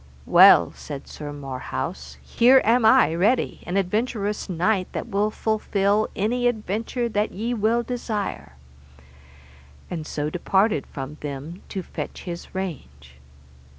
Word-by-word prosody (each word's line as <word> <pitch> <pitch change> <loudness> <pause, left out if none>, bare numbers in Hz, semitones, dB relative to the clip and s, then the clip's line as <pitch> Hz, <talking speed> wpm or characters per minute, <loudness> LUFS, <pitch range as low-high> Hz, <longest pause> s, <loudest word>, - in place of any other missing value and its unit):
Well, 85 - +7
said 140 -2 -9
Sir 150 -1 -7
Marhaus, 130 - -6
here 245 - +5
am 230 +1 +4
I 220 -6 +5
ready, 205 +9 +1
an 180 +2 -1
adventurous 210 +1 -1
knight 185 +2 0
that - - -4
will 205 +2 +1
fulfil 215 -1 0
any 245 +5 +1
adventure 225 +2 -2
that 210 -1 0
ye 225 +5 -2
will 230 +1 +1
desire; 210 - -4 1.4
and 160 -3 -4
so 150 0 -3
departed 190 -1 +1
from 140 +2 -7
them, 145 +5 -6
to 190 - -4
fetch - - -7
his 175 0 -8
range. 70 - -7
195 Hz, 125 wpm, -24 LUFS, 150-220 Hz, 1.4 s, Well